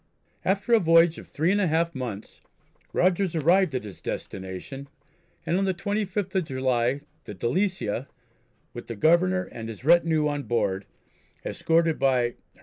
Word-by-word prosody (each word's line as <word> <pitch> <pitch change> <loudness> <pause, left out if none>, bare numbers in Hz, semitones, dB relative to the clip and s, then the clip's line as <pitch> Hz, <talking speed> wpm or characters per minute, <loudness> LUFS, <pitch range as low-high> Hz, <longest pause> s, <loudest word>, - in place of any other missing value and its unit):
After 200 +4 +1
a 230 - +7
voyage 165 -1 +4
of - - -12
three 160 +5 0
and 205 +1 +2
a 190 - +2
half 165 +1 +1
months 120 -6 -6 0.5
Rogers 185 -1 +1
arrived 170 0 +3
at 130 - -2
his 105 -3 -10
destination, 95 +9 -6 0.6
and 170 - +1
on 195 - +1
the 190 -1 0
25th 200 0 -2
of 185 -3 +1
July 130 -1 0 0.2
the 105 - -8
Delicia, 130 - -1 0.7
with 120 - -8
the 115 - -5
Governor 180 - +3
and 115 -1 -7
his 115 +3 -9
retinue 160 -2 +4
on 145 -1 -2
board, 100 -7 -1 0.6
escorted 165 -1 +1
by 130 -2 +3
H.M. 120 0 -3
160 Hz, 155 wpm, -26 LUFS, 125-185 Hz, 0.7 s, a